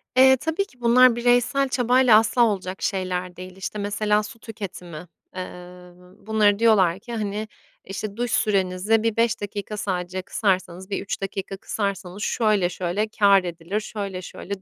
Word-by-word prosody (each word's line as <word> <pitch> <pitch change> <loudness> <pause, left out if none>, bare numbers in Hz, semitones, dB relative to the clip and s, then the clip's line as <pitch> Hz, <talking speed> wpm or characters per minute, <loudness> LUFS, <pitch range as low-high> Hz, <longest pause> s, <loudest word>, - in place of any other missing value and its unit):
E, 265 +1 +7
tabii 320 +8 -1
ki 250 -9 -25
bunlar 245 +1 +6
bireysel 245 +3 +2
çabayla 250 -2 +5
asla 225 +2 +2
olacak 190 -3 -3
şeyler 185 -2 -2
değil. 185 0 -10
İşte, 195 +2 -5
mesela, 210 +1 +1
su 225 +2 -10
tüketimi, 180 -7 -8 0.3
eee, 185 - -3 0.9
bunları 210 -2 +3
diyorlar 195 -6 +4
ki, 235 +4 -9
hani, 210 -1 -3 0.4
işte, 200 +2 -6
duş 240 -1 -2
sürenizi 200 +1 +1
bir 225 -1 0
5 230 -2 +1
dakika 205 +1 -5
sadece 185 -2 -3
kısarsanız, 185 -2 -1
bir 195 - -2
3 200 - -5
dakika 195 0 -4
kısarsanız 200 -1 -4
şöyle 210 -6 +1
şöyle 180 +4 -2
kâr 200 -3 +4
edilir, 175 +3 -3
şöyle 200 -3 -5
şöyle 195 +1 -7
205 Hz, 150 wpm, -23 LUFS, 185-225 Hz, 0.9 s, E